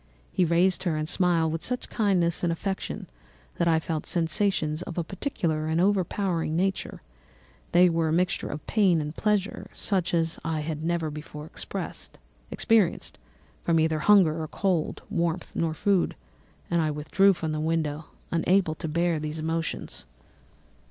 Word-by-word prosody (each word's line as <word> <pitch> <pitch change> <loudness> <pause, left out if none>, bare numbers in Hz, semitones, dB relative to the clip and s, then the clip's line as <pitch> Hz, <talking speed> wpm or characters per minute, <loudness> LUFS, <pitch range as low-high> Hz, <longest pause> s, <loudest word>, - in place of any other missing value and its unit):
He 180 - +2
raised 175 +2 +3
her 170 -4 0
and 155 0 -2
smiled 170 -2 +2
with 165 0 -3
such 250 0 -2
kindness 180 -7 +1
and 175 - +2
affection 190 +3 -3 0.5
that 170 - +2
I 160 -1 +4
felt 160 -1 -3
sensations 165 -2 0
of 180 -1 -7
a 170 - +1
peculiar 165 - -2
and 160 +1 +1
overpowering 185 -3 +1
nature; 190 +2 -1 0.7
they 180 +1 +6
were 165 -1 +1
a - - 0
mixture 175 +2 +1
of 150 - -6
pain 195 -6 +3
and 150 +1 -4
pleasure, 210 -1 0
such 185 -4 0
as 165 -1 0
I 160 -1 -1
had 155 0 -4
never 165 -2 0
before 150 0 -8
experienced, - - -6 1.5
either 160 -2 +3
from - - -5
hunger 175 -6 +5
or 155 - -3
cold, 180 -2 -1
warmth 170 +1 -1
or 160 -1 0
food; 195 +3 +1 0.6
and 170 -1 +3
I 155 - +1
withdrew 155 +7 +3
from 160 -3 -3
the 155 - -2
window, 155 -1 -1 0.3
unable 170 0 +2
to 160 - -6
bear 170 +1 +1
these 155 +1 -4
emotions. 160 - -3
165 Hz, 155 wpm, -27 LUFS, 155-180 Hz, 1.5 s, they